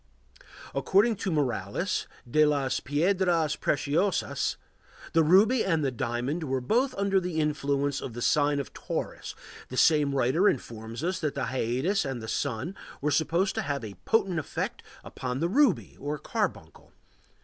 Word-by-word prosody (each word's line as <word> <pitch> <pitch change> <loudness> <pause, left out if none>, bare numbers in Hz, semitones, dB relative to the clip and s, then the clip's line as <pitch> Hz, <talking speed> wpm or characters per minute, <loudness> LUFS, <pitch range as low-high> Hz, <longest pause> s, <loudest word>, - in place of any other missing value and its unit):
According 200 - +3
to 190 - -2
Morales 145 -6 -1 0.2
(De 155 +6 +4
las 140 -3 +1
piedras 170 +1 +1
preciosas), 155 +7 0 0.6
the 165 - +5
ruby 205 +10 +5
and 165 -6 +1
the 135 - +1
diamond 125 +7 -2
were 135 -2 0
both 240 - +1
under 195 -1 +2
the 175 -3 -3
influence 145 -2 0
of 125 - -6
the 120 - -6
sign 145 -1 +3
of 140 - -6
Taurus; - - -5 0.3
the 130 - -6
same 150 -2 +4
writer 140 +10 +3
informs 115 0 -5
us 180 +1 -1
that 150 -4 -2
the - - -2
Hyades 130 - 0
and 135 -4 -3
the 110 - -7
sun 140 - -2 0.3
were 150 +1 0
supposed 170 +6 +1
to - - -1
have 140 -3 -3
a 105 - -7
potent 190 -7 +2
effect 155 - -4 0.2
upon 125 0 -4
the 165 - +1
ruby 235 - +2
or 145 +2 -3
carbuncle. - - -4
150 Hz, 155 wpm, -28 LUFS, 135-180 Hz, 0.6 s, the